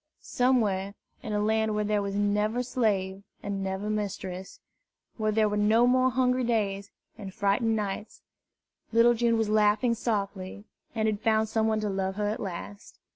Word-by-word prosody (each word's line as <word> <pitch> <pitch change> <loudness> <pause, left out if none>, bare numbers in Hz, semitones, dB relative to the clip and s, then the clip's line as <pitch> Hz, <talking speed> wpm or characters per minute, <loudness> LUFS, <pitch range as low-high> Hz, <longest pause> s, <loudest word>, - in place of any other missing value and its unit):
Somewhere, 210 -6 +1 0.3
in 220 - -6
a 210 - 0
land 220 0 +1
where 210 - 0
there 210 0 0
was 200 0 -3
never 210 +4 +1
slave 200 -6 -1 0.2
and 200 -1 -3
never 190 +2 -3
mistress, 195 -3 -4 0.6
where 215 -1 0
there 215 0 +3
were 210 - -1
no 215 +3 +4
more 255 +1 +4
hungry 255 0 +1
days 200 -4 -1 0.3
and 195 -2 -7
frightened 205 +4 +1
nights, 210 0 -4 0.7
little 230 +1 +5
June 235 0 +1
was 220 -1 +1
laughing 215 +3 +3
softly, 200 -3 -3 0.3
and 220 -1 +1
had 210 -1 -1
found 220 -2 +2
some 220 0 +1
one 220 -1 0
to 210 - -1
love 190 0 -2
her 210 0 -1
at 215 - -3
last. 200 +2 -7
210 Hz, 170 wpm, -27 LUFS, 200-225 Hz, 0.7 s, little